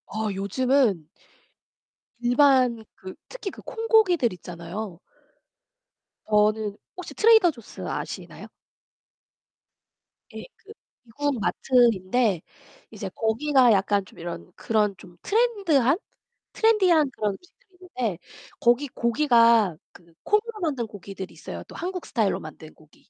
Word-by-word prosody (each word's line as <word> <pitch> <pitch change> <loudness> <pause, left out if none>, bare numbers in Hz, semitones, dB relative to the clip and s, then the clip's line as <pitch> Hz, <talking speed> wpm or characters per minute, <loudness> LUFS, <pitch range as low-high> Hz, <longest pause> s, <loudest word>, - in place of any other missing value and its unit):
어 215 +1 -3
요즘은 205 - +1 1.1
일반 245 -2 +3
그 185 0 -10 0.2
특히 455 -6 -6
그 - - -13
콩고기들 425 - +2
있잖아요. 175 +2 -8 1.3
저는 210 0 +2 0.2
혹시 365 - -8
Trader 445 -5 +5
Jaws 235 -7 -13
아시나요? - - -6 1.9
예. - - -7
그 415 - -16 0.3
미국 265 +3 -3
마트인데 225 -4 +2 0.5
이제 205 -3 -6
거기가 250 +3 +3
약간 200 0 +1
좀 - - -17
이런 170 - -7
그런 210 -3 0
좀 175 -1 -16
Trend 430 -6 +1
한? 270 +2 +4 0.6
Trendy 425 -5 +3
한 305 -4 +3
그런 210 -4 -2
음식들이 365 - -19 0.2
있는데 210 -9 -1 0.4
거기 240 +5 +3
고기가 235 - +3 0.2
그 170 -1 -19
콩으로 425 +1 0
만든 275 -9 -2
고기들이 195 -2 -9
있어요. - - -8
또 - - -13
한국 365 0 -5
스타일로 220 -6 0
만든 155 0 -11
고기 155 -1 -24
235 Hz, 280 characters per minute, -25 LUFS, 200-300 Hz, 1.9 s, Trader